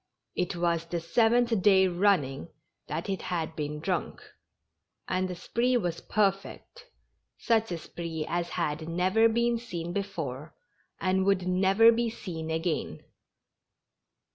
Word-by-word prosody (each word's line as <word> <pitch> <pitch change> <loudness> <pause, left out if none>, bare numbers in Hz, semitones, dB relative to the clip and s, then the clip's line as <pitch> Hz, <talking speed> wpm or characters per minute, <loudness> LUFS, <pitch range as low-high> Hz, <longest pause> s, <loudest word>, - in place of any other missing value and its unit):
It 180 - -1
was 170 -1 0
the 170 +1 -3
seventh 225 +5 +2
day 190 -1 +5
running 175 -7 +1 0.4
that 160 +5 -4
it 195 -1 -2
had 165 -2 -3
been 150 0 -4
drunk. 180 +3 -2 0.9
And 185 0 0
the 180 - -4
spree 240 +8 0
was 175 -7 -2
perfect 205 - -2 0.3
— - - -50
such 225 -3 +1
a 170 - -2
spree 165 -1 -5
as 175 0 -2
had 160 -1 -2
never 190 +7 +3
been 235 +1 +1
seen 175 -7 -5
before, 160 -8 -4 0.4
and 190 0 +1
would 190 -2 +2
never 195 +5 +5
be 235 0 0
seen 165 -8 -6
again. 160 - -2
180 Hz, 135 wpm, -28 LUFS, 165-210 Hz, 0.9 s, day